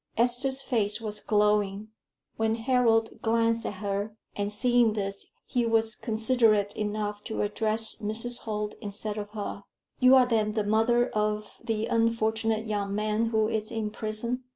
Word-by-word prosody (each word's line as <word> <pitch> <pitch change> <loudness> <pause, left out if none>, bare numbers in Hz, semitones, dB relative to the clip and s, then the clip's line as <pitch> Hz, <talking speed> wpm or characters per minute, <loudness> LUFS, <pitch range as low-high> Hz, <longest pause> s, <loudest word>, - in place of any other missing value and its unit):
Esther's 255 +3 +1
face 215 -5 +2
was 210 -2 -3
glowing, 210 -1 +1 0.5
when 220 0 +1
Harold 230 -2 +2
glanced 230 0 +1
at - - -4
her; 205 +2 -2 0.2
and 205 0 -2
seeing 240 0 +3
this, 200 -2 -4 0.2
he 245 - 0
was 225 -1 +2
considerate 220 -2 +1
enough 210 -1 -3
to 220 - -2
address 220 +1 0
Mrs. 225 +3 -2
Holt 210 -1 -3
instead 210 +1 -5
of 205 0 -6
her. 205 -1 -5 0.4
"You 255 +1 +7
are 255 -1 +6
then 220 -3 +1
the 215 -1 0
mother 225 +4 +2
of 210 0 -2
the 225 -2 -1
unfortunate 225 -1 0
young 200 -2 -2
man 215 +2 0
who 220 -1 +1
is 215 -1 -2
in 220 -2 -3
prison?" 225 +4 -3
220 Hz, 155 wpm, -27 LUFS, 210-230 Hz, 0.5 s, You